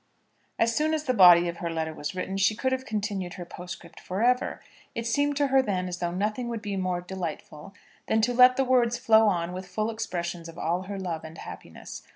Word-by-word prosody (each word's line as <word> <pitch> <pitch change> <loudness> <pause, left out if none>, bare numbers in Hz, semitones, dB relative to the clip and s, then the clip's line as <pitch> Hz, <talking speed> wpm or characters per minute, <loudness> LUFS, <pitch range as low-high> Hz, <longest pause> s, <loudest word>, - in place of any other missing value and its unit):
As 230 0 +2
soon 310 +1 +2
as 305 - -3
the 255 - 0
body 175 -5 +7
of 170 0 -4
her 170 - -3
letter 160 -1 -3
was 150 +3 -5
written, 190 +1 -3
she 200 +2 +2
could 260 +4 -1
have 260 0 -2
continued 205 -4 -3
her 175 - -7
postscript 175 0 -10
for 190 +4 -3
ever. 250 +1 +1 0.4
It 230 - -3
seemed 285 +5 +1
to 285 -1 +2
her 270 - +6
then 185 -6 -2
as 180 0 -5
though 175 - -1
nothing 210 +7 -2
would 230 -2 -5
be 205 -2 -3
more 185 -2 -1
delightful 180 -1 -7 0.3
than 220 - +2
to 245 +3 +1
let 250 +1 +6
the 270 - +2
words 240 -2 +3
flow 220 -2 +5
on 175 -3 0
with 185 0 -6
full 215 +5 -2
expressions 175 -6 -4
of 165 - -12
all 175 +2 -1
her 200 - -4
love 175 -4 -4
and 160 +1 -10
happiness. - - -9
195 Hz, 225 wpm, -27 LUFS, 175-230 Hz, 0.4 s, body